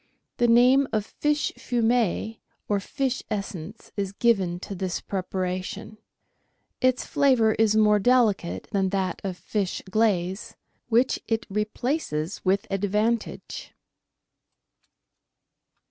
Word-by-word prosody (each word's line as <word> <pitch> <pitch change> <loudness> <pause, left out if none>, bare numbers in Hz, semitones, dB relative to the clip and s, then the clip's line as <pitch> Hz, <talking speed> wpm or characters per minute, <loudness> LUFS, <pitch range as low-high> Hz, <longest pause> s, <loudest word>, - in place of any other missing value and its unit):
The 240 - +3
name 250 +4 +5
of 215 -2 0
fish 295 +3 -1
fumet 230 -2 0 0.3
or 205 -1 +1
fish 265 +6 -2
essence 195 -5 -5
is 195 -1 -2
given 195 -6 +1
to 200 - -6
this 185 -1 -3
preparation; 185 +2 -4 0.8
its 255 0 +2
flavour 260 -7 +3
is 215 -1 +2
more 210 -1 +5
delicate 220 -6 +2
than 195 -1 +1
that 190 -2 -2
of 190 -2 -3
fish 200 -2 -2
glaze, 195 -3 0 0.3
which 240 +3 +3
it 225 0 -1
replaces 210 - -2
with 195 +1 +2
advantage. 210 +4 -2
210 Hz, 105 wpm, -25 LUFS, 190-235 Hz, 0.8 s, name